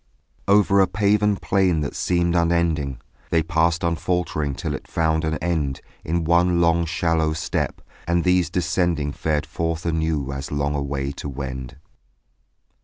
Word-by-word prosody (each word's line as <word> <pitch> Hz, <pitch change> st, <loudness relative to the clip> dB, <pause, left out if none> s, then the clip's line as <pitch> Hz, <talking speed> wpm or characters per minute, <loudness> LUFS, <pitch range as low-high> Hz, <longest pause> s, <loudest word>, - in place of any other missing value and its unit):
Over 100 Hz, 0 st, +4 dB
a 95 Hz, -, +5 dB
paven 105 Hz, +2 st, +2 dB
plain 95 Hz, -6 st, +1 dB
that 70 Hz, -, -4 dB
seemed 85 Hz, -1 st, +1 dB
unending 85 Hz, -6 st, +1 dB, 0.3 s
They 80 Hz, -1 st, +2 dB
passed 85 Hz, +2 st, +1 dB
unfaltering 85 Hz, -3 st, -1 dB
till -, -, -3 dB
it -, -, -6 dB
found 80 Hz, -1 st, 0 dB
an 80 Hz, 0 st, -1 dB
end 75 Hz, -6 st, -1 dB, 0.2 s
In 85 Hz, +1 st, -1 dB
one 85 Hz, +1 st, +3 dB
long 85 Hz, 0 st, +3 dB
shallow 80 Hz, -2 st, +1 dB
step; 80 Hz, +2 st, -2 dB, 0.3 s
and 85 Hz, 0 st, +2 dB
these 90 Hz, -1 st, +2 dB
descending 85 Hz, -4 st, 0 dB
Fared 75 Hz, 0 st, -1 dB
forth 80 Hz, +2 st, -3 dB
anew 80 Hz, -4 st, -1 dB
as 70 Hz, +1 st, -6 dB
long 75 Hz, 0 st, 0 dB
away 70 Hz, -1 st, -2 dB
to 70 Hz, -, -6 dB
wend. 65 Hz, -2 st, -6 dB
80 Hz, 145 wpm, -23 LUFS, 75-85 Hz, 0.3 s, a